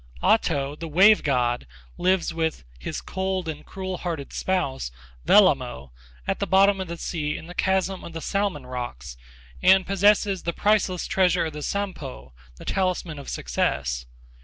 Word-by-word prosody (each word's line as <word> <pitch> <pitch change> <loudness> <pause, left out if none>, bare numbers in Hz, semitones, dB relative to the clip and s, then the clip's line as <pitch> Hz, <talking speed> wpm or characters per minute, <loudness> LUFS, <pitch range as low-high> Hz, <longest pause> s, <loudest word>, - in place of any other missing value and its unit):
Ahto, 140 0 +2
the 165 +2 -6
wave 195 +7 +6
god, 120 - 0 0.3
lives 185 0 +1
with 160 - -2 0.2
'his - - -5
cold 190 -2 -2
and 155 -2 -5
cruel 190 -1 -5
hearted 160 -6 -4
spouse,' 140 - -1 0.4
Wellamo, 130 - +4 0.4
at - - -1
the - - -1
bottom 195 0 +4
of 190 - -4
the 170 0 -5
sea 150 -3 -3
in - - -9
the 175 - -9
chasm 190 0 0
of 170 - -9
the 165 - -4
Salmon 195 -6 -1
Rocks, 120 - -6 0.5
and 190 0 +6
possesses 200 0 +3
the 170 - -2
priceless 205 -3 +1
treasure 180 -2 +2
of 160 - -4
the 150 - -6
Sampo, 150 - -4 0.2
the - - -12
talisman 180 -5 -1
of 140 - -8
success. - - -1
170 Hz, 160 wpm, -25 LUFS, 135-190 Hz, 0.5 s, wave